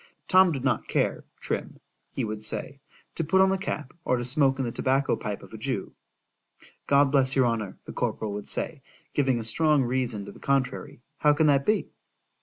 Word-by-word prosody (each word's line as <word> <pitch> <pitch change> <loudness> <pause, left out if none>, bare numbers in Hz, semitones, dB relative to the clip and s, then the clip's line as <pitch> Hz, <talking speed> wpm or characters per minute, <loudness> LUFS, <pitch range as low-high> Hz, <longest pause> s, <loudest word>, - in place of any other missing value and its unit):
——Tom 185 -1 +6
did 135 -4 -3
not 130 -4 0
care, - - 0 0.2
Trim, - - -4 0.3
he 130 - -2
would 105 0 -5
say, 135 +5 -4 0.3
to 165 - -2
put 165 +5 +2
on 190 0 +5
the 195 - +1
cap, 150 -8 -4
or 125 - +1
to 120 - -3
smoke 135 +1 +3
in 135 - -1
the 120 - -2
tobacco 135 +3 +1
pipe - - -5
of - - -14
a - - -8
Jew.——God 140 -1 -3
bless 135 -2 +3
your 130 -2 +4
honour, 115 -4 -2
the - - -8
corporal 105 -2 -2
would 105 0 -6
say 155 -4 -3 0.3
(giving 130 -4 +2
a - - -4
strong 150 +5 +2
reason 120 -5 -1
to 100 - -8
the - - -15
contrary)—how 140 +3 0
can 155 +2 +2
that 140 -2 +3
be? 215 0 +1
135 Hz, 195 wpm, -27 LUFS, 120-150 Hz, 0.3 s, Tom